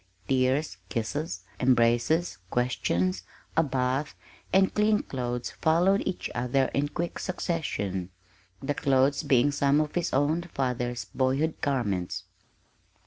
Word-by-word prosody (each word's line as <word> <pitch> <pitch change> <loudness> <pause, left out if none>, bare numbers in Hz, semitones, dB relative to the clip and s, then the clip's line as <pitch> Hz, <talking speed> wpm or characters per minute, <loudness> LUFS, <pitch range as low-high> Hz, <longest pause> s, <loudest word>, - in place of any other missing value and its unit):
Tears, 130 -3 +1
kisses, 115 - -3 0.2
embraces, 125 - +2
questions, 95 -7 0 0.3
a 165 - +5
bath, 135 0 -1 0.4
and 190 0 +4
clean 210 0 +3
clothes 125 -2 -3
followed 180 +5 +3
each 190 - -2
other 125 +2 +1
in 145 +1 +1
quick 170 +3 -3
succession 105 - -2 0.5
the 145 - 0
clothes 135 0 +2
being 135 +2 +3
some 140 0 +3
of 155 -1 -1
his 175 -2 -1
own 145 +5 +2
father's 125 -2 -1
boyhood 135 +5 0
garments. 95 -9 -1
135 Hz, 115 wpm, -28 LUFS, 120-155 Hz, 0.5 s, a